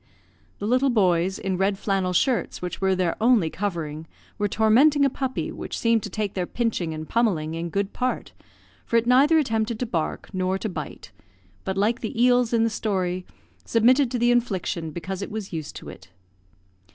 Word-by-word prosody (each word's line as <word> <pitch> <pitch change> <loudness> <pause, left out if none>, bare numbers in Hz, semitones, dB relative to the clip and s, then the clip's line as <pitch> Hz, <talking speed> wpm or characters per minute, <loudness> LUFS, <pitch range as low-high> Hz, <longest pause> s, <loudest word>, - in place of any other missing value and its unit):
The 205 - -5
little 255 +5 +3
boys, 190 -5 +2
in 190 -1 -2
red 195 +1 +1
flannel 195 -2 0
shirts 220 - 0
which 180 +1 -5
were 190 0 +2
their 180 -2 0
only 225 -9 +4
covering, 165 -5 -4 0.3
were 205 - +2
tormenting 255 +8 +4
a 275 - +2
puppy, 265 -1 -3
which - - -6
seemed 230 -1 +2
to 205 - -6
take 205 0 -3
their 180 -2 -2
pinching 225 -8 -1
and 155 0 -6
pummelling 180 -10 0
in 165 +1 -4
good 195 +3 -2
part, 255 0 -2 0.5
for 230 - +1
it 230 - +2
neither 275 +6 +5
attempted 225 -6 0
to 250 - -2
bark 170 -9 -3
nor 185 0 0
to 215 - -4
bite, 185 - -7 0.5
but, 190 0 -3
like 220 +5 +1
the 225 0 -4
eels 245 -1 +4
in 230 -1 +3
the 230 - +2
story, 185 -4 -2 0.4
submitted 250 +4 +3
to 250 - -2
the 240 +1 +3
infliction 190 -8 -1
because 185 +4 -5
it - - -4
was 210 -3 -6
used 155 -3 -5
to - - -8
it. - - -13
205 Hz, 190 wpm, -24 LUFS, 185-235 Hz, 0.5 s, neither